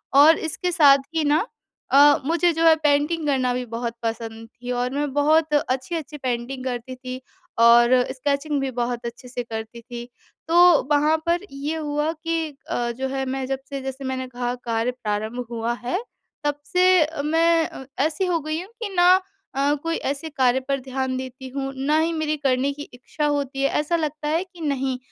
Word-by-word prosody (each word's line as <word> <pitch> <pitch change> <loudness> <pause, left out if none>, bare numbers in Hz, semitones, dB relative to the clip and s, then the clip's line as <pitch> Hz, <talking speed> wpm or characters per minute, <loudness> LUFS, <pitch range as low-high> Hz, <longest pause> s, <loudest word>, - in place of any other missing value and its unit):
और 300 +4 +8
इसके 340 +3 -2
साथ 290 -5 +7 0.2
ही 320 - +2
ना 300 +6 +2 0.5
अ, 290 +1 +7
मुझे 340 +3 +2
जो 325 +1 0
है 325 -1 +8
पेंटिंग 300 +2 +2
करना 260 -3 +1
भी 250 0 -3
बहुत 235 0 -2
पसंद 225 0 -4
थी 245 +1 -8
और 245 0 0
मैं 290 0 -1
बहुत 305 +2 +3
अच्छी-अच्छी 295 +3 -1
पेंटिंग 255 0 -3
करती 250 0 -4
थी 255 0 -7 0.4
और 235 +1 +7 0.2
स्केचिंग 280 +2 -1
भी 270 -1 -2
बहुत 240 0 -2
अच्छे 235 +2 -7
से 245 0 -4
करती 225 0 -7
थी। 240 0 -8 0.4
तो, 345 -1 +6
वहाँ 300 +2 +4
पर 340 +1 +1
ये 280 +3 -3
हुआ 300 0 -1
कि 325 0 -2 0.2
अ, 240 0 -1
जो 260 +3 -3
है 270 0 -2
मैं 265 0 -3
जब 270 0 -2
से 275 -1 -4
जैसे 265 +1 -6
मैंने 260 -1 -3
कहा 245 -1 -3
कार्य 230 +1 0
प्रारंभ 220 0 -3
हुआ 230 0 -1
है, 365 - -2 0.4
तब 290 0 -1
से 360 -4 +4
मैं 330 +2 +3
अ, 265 - -10 0.2
ऐसी 320 +4 -1
हो 350 -2 +1
गई 310 +2 -3
हूँ 370 - -11
कि 425 - -2
ना 355 0 +6 0.4
अ, 280 +2 +2
कोई 330 0 -1
ऐसे 285 +3 -4
कार्य 260 -4 +2
पर 275 -1 0
ध्यान 260 0 -2
देती 260 0 -7
हूँ, 270 +1 -4
ना 280 +3 +1
ही 325 +1 +1
मेरी 310 -1 -1
करने 270 -1 +1
की 290 +1 -7
इच्छा 260 +4 -4
होती 285 -2 -1
है। 275 - +3
ऐसा 300 +3 0
लगता 305 -2 -2
है 325 +4 +1
कि 365 -3 -16
नहीं, 270 -4 -1
275 Hz, 190 wpm, -23 LUFS, 250-310 Hz, 0.5 s, और